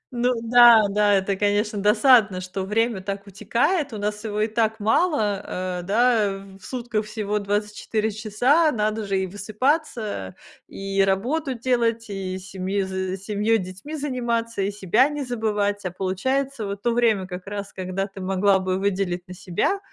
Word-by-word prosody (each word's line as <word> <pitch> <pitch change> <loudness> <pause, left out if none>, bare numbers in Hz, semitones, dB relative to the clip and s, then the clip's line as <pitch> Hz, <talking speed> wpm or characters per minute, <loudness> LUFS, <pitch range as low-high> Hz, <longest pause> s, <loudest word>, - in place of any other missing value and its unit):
Ну 245 +1 +2
да, 235 -1 +8
да, 205 0 +3
это, 195 0 0
конечно, 205 +1 0
досадно, 215 -2 +5
что 185 +1 -5
время 220 0 0
так 200 +1 -5
утекает, 235 - 0
у - - -4
нас 210 +1 -3
его 210 -1 -2
и 215 - +2
так 220 0 0
мало. 215 - +1 0.4
Э, - - -4
да, 205 -1 +1
в - - -22
сутках 235 -4 -3
всего 210 -1 -2
24 210 +2 -2
часа, 245 +10 +2
надо 215 -1 -1
же 195 -1 0
и 190 - -1
высыпаться, 215 - -2 0.3
и 195 0 -2
работу 255 +9 0
делать, 230 -2 0
и 190 -1 -4
семьёй 190 +1 -3
з 190 0 -3
семьей, 210 +2 +1
детьми 190 +11 -7
заниматься, 235 -6 -2
и 195 - 0
себя 205 +7 +2
не 295 -1 -4
забывать. 210 -4 -1
А 185 - -2
получается, 220 +6 -2
вот 200 0 -6
то 240 - +2
время 225 -5 +2
как 180 +1 -8
раз, 205 0 -6
когда 185 +1 -3
ты 195 -1 -10
могла 190 +1 +2
бы 185 0 -1
выделить 190 -2 -1
на 185 - -8
себя, 190 - -1
210 Hz, 165 wpm, -23 LUFS, 195-235 Hz, 0.4 s, да